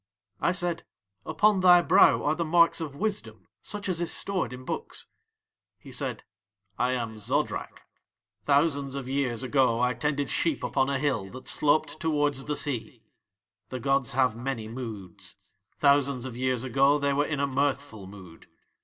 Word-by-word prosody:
I - - +2
said: 175 -2 -1 0.4
'Upon 210 -2 +3
thy 180 -1 +6
brow 185 +4 +5
are 150 - +2
the 170 +2 -2
marks 170 +1 +3
of 150 -4 -5
wisdom 210 +5 -4 0.2
such 205 -1 -5
as 175 -2 -1
is 170 - 0
stored 195 -7 -1
in 130 0 -9
books.' - - -5 0.7
He - - -14
said: - - -4 0.6
'I 125 +1 +2
am 115 -3 -4
Zodrak. 105 - -2 0.6
Thousands 140 -1 +1
of 135 -2 -5
years 130 -3 -1
ago 130 -3 +2
I 125 +1 +2
tended 145 +1 -2
sheep 160 -5 0
upon 135 -1 +1
a 140 - 0
hill 130 -9 -1
that 130 +5 -11
sloped 155 +1 +1
towards 145 -4 0
the 150 - -2
sea. 125 -5 -3 0.7
The 130 - -5
gods 135 -1 +1
have 130 -3 +2
many 120 -2 -4
moods. 110 -7 -8 0.4
Thousands 140 -3 +2
of 125 -3 -6
years 130 -1 -1
ago 135 +3 +3
They 140 -1 0
were 145 +1 +2
in 150 -3 -2
a 140 - +2
mirthful 140 -6 -2
mood. 95 -4 -13
140 Hz, 160 wpm, -27 LUFS, 125-150 Hz, 0.7 s, thy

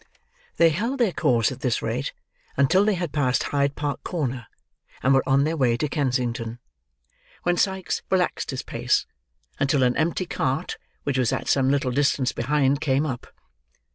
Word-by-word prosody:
They 165 - +6
held 230 - -2
their 230 -6 +3
course 120 -8 +2
at 130 - -7
this 125 -4 -1
rate, 125 +5 -2 0.5
until 170 +8 +4
they 210 -1 +2
had 175 -4 -3
passed 130 -4 +1
Hyde 140 0 0
Park 145 -1 -3
corner, 130 - -3 0.6
and 130 - +4
were 135 - +5
on 135 +1 +4
their 160 +2 0
way 125 -6 +2
to 150 - 0
Kensington: 125 -5 -1 0.9
when 175 0 +2
Sikes 190 +1 0
relaxed 185 -2 0
his 130 -1 -3
pace, 120 +2 0 0.5
until 140 -1 +2
an 125 0 +2
empty 170 +3 0
cart 140 0 -2 0.2
which 135 -2 0
was 125 -3 +2
at - - -2
some 135 -1 +3
little 140 -2 +1
distance 140 -1 +1
behind, 140 +2 +1
came 140 -1 +1
up. 130 -5 -4
140 Hz, 170 wpm, -24 LUFS, 130-160 Hz, 0.9 s, They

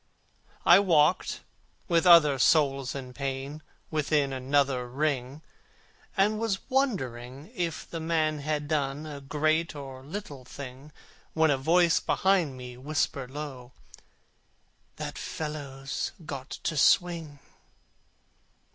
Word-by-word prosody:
I - - +8
walked, 170 -3 +2 0.5
with 170 0 +3
other 150 -6 +7
souls 140 -2 +3
in 130 -2 -7
pain, 135 +2 -4 0.3
Within 150 -2 +1
another 130 -1 +1
ring, 140 +1 -2 0.7
And 210 +2 +3
was 220 -4 -2
wondering 135 - -1
if 170 -3 -3
the 165 - -5
man 160 -2 0
had 150 0 -2
done 145 -1 -1
A 145 -2 -7
great 155 +4 0
or 135 -2 -8
little 145 -4 -7
thing, 135 +2 -10 0.4
When 160 -1 +3
a - - +3
voice 170 +4 +4
behind 180 -9 +1
me 125 -1 -9
whispered 135 -1 -2
low, 130 -3 -7 1.2
"That - - -6
fellow's 140 -3 -4
got 135 -2 -6
to 160 - -3
swing." 165 -1 +3
145 Hz, 110 wpm, -28 LUFS, 135-160 Hz, 1.2 s, I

